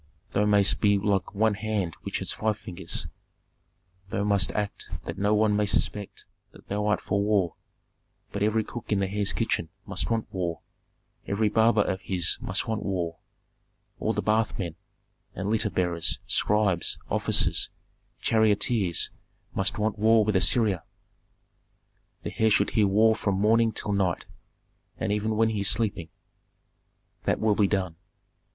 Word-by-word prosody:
"Thou 105 - +2
mayst 100 -1 +3
be 100 -1 +4
like 100 0 -1
one 110 +1 +3
hand 105 -5 -2
which - - -3
has - - -3
five 110 -1 -1
fingers. 90 -3 -5 1.0
Thou 100 - -1
must 100 -3 +2
so - - -7
act 105 -1 -3 0.2
that - - -5
no 105 +2 +2
one 105 -1 +3
may 105 0 +1
suspect 100 0 -2 0.3
that - - -17
thou 105 +1 -1
art 105 - +2
for 100 +1 -1
war, 100 -5 +1 0.8
but 100 - -4
every 110 +1 +2
cook 120 +1 -8
in 105 - +3
the 100 - 0
heir's 100 0 -1
kitchen 80 - -1 0.2
must - - -2
want 115 -1 0
war, 85 -3 -2 0.7
every 105 +2 +1
barber 110 0 +4
of 95 -1 -2
his 90 -4 +1
must - - -2
want 110 -2 -1
war, 85 -4 -3 0.8
all - - 0
the - - -2
bath 110 +1 +1
men, 85 -5 -3 0.6
and 100 +2 -2
litter 110 -1 +1
bearers, 85 -3 0
scribes, 100 -5 +1
officers, - - +2 0.5
charioteers 110 -4 +2 0.4
must 95 +4 0
want 105 0 -1
war 110 0 +5
with 105 -1 0
Assyria; 95 0 +3 1.4
the - - -5
heir 110 - +4
should 110 - +2
hear 105 -2 +3
war 110 +3 +4
from 100 -3 -1
morning 110 +3 +3
till 105 - -3
night, 95 -3 0 0.7
and 110 - -2
even 105 +1 0
when 115 0 +3
he 110 -2 -2
is 100 - +3
sleeping." 100 -7 +1 1.2
"That - - +1
will 110 -1 +3
be 100 -1 +3
done." 95 -5 -1
105 Hz, 160 wpm, -27 LUFS, 95-110 Hz, 1.4 s, war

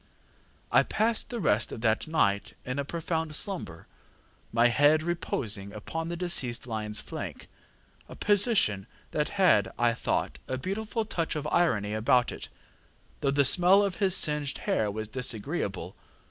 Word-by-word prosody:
ŌĆ£I - - +4
passed 225 +3 0
the 240 -2 -4
rest 110 - +1
of 110 - -7
that 110 +3 +1
night 100 -11 +1
in 125 +2 -3
a - - 0
profound 160 0 -3
slumber, 150 - -4 0.7
my 115 +1 +4
head 145 +5 +4
reposing 110 - -2
upon 160 +10 -5
the 170 - -4
deceased 135 -9 +1
lionŌĆÖs 110 -3 -4
flank, - - -7 0.6
a - - -9
position 205 - +2 0.2
that 150 0 0
had, 180 - +4
I 120 -1 +3
thought, 115 - -2
a 130 - -2
beautiful 215 - -3
touch 170 -7 -2
of 150 -1 -3
irony 105 -12 +2
about 120 +3 +2
it, - - -7 0.7
though 140 - 0
the 140 0 +3
smell 180 +7 +5
of 195 -2 -2
his 195 -3 +3
singed 150 -2 -1
hair 105 - +1
was 110 +1 -4
disagreeable. 110 - -2
140 Hz, 150 wpm, -28 LUFS, 110-175 Hz, 0.7 s, smell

